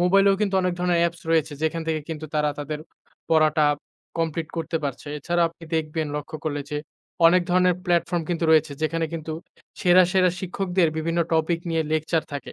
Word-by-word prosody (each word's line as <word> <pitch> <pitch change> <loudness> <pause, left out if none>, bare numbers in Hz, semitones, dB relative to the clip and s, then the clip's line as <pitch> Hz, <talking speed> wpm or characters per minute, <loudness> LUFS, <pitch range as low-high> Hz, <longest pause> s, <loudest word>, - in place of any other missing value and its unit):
মোবাইলেও 195 +2 +5
কিন্তু 200 -2 0
অনেক 180 - +1
ধরনের 175 -1 +2
অ্যাপস 170 0 0
রয়েছে 155 -2 +2
যেখান 160 +1 0
থেকে 160 -1 0
কিন্তু 155 -1 -5
তারা 150 -1 +2
তাদের 150 +1 -4 0.5
পড়াটা 155 -1 +4 0.5
কমপ্লিট 160 -1 -1
করতে 165 0 -2
পারছে। 140 +1 -4
এছাড়াও 170 +3 +1
আপনি 165 0 -14
দেখবেন 155 0 -1
লক্ষ 145 -1 -6
করলে 145 -2 -1
যে 150 - -1 0.5
অনেক 180 +1 +5
ধরনের 180 0 +4
প্লাটফর্ম 175 -1 +1
কিন্তু 170 -1 -1
রয়েছে 160 -1 +4
যেখানে 165 +1 0
কিন্তু 160 -1 -4 0.5
সেরা, 185 -1 +6
সেরা 185 -2 +4
শিক্ষকদের 185 -2 0
বিভিন্ন 165 +2 -1
টপিক 165 +1 +1
নিয়ে 165 -1 +1
লেকচার 155 +1 +1
থাকে। 140 - -6
165 Hz, 175 wpm, -24 LUFS, 155-175 Hz, 0.5 s, সেরা